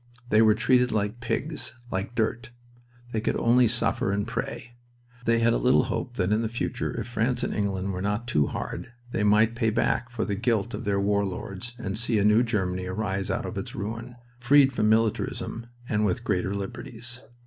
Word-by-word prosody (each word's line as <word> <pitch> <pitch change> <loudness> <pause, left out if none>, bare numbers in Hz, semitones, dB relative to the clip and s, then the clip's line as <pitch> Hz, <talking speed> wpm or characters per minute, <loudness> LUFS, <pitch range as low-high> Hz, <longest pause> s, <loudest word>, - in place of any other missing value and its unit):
They 110 - +6
were 110 -1 +6
treated 125 +2 +3
like 105 +2 -1
pigs, 145 +4 -3 0.2
like 95 +6 -3
dirt. 120 +2 -1 0.6
They 110 - -1
could - - 0
only 120 +1 +4
suffer 115 -3 0
and 100 +1 0
pray. 120 0 -5 0.5
They 115 0 +3
had 115 0 +3
a - - +1
little 125 +1 +4
hope 120 - -3
that 90 +1 +1
in 105 +1 +3
the 115 - -1
future, 120 +1 -3
if - - -3
France 120 +1 0
and - - -1
England 100 -1 -1
were 90 - -4
not 105 +4 -1
too 75 -12 +2
hard, 125 - -5 0.2
they 110 - 0
might 105 +2 +4
pay 115 -1 +1
back 120 +2 0
for 120 -2 -2
the 105 - -2
guilt 115 +1 0
of - - -5
their 100 -1 +1
war 100 +1 +2
lords 100 +5 -6
and 105 -3 -3
see 115 -1 +2
a 100 - +2
new 105 +2 +6
Germany 95 -6 -1
arise 95 0 -2
out - - -1
of - - -4
its - - -6
ruin, 115 +4 -5 0.2
freed 135 +2 +5
from 105 -3 +2
militarism 115 +1 0 0.2
and 105 -1 +1
with 95 -4 0
greater 95 +2 0
liberties. 115 +5 -6
110 Hz, 200 wpm, -26 LUFS, 100-120 Hz, 0.6 s, They